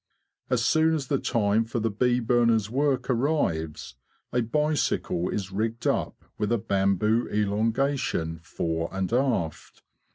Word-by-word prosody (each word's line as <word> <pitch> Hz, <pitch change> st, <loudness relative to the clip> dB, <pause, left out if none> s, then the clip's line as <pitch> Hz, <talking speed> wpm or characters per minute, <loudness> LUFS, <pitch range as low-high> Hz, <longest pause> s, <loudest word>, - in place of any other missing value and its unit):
As 120 Hz, -2 st, +1 dB
soon 160 Hz, +4 st, +3 dB
as 140 Hz, -4 st, -4 dB
the 140 Hz, -, +1 dB
time 110 Hz, -2 st, +1 dB
for 115 Hz, +1 st, -3 dB
the 115 Hz, 0 st, 0 dB
bee 125 Hz, +4 st, +2 dB
burners' 115 Hz, -3 st, +2 dB
work 140 Hz, 0 st, +1 dB
arrives, 115 Hz, -, -1 dB, 0.4 s
a 125 Hz, -, +2 dB
bicycle 130 Hz, -, 0 dB
is 95 Hz, -2 st, -3 dB
rigged 110 Hz, +4 st, -2 dB
up -, -, -1 dB
with 105 Hz, +1 st, 0 dB
a 120 Hz, -, +3 dB
bamboo 100 Hz, +2 st, +1 dB
elongation 105 Hz, -, 0 dB
fore 85 Hz, 0 st, -3 dB
and 95 Hz, +2 st, -2 dB
aft. 120 Hz, -, -1 dB
115 Hz, 135 wpm, -26 LUFS, 100-125 Hz, 0.4 s, soon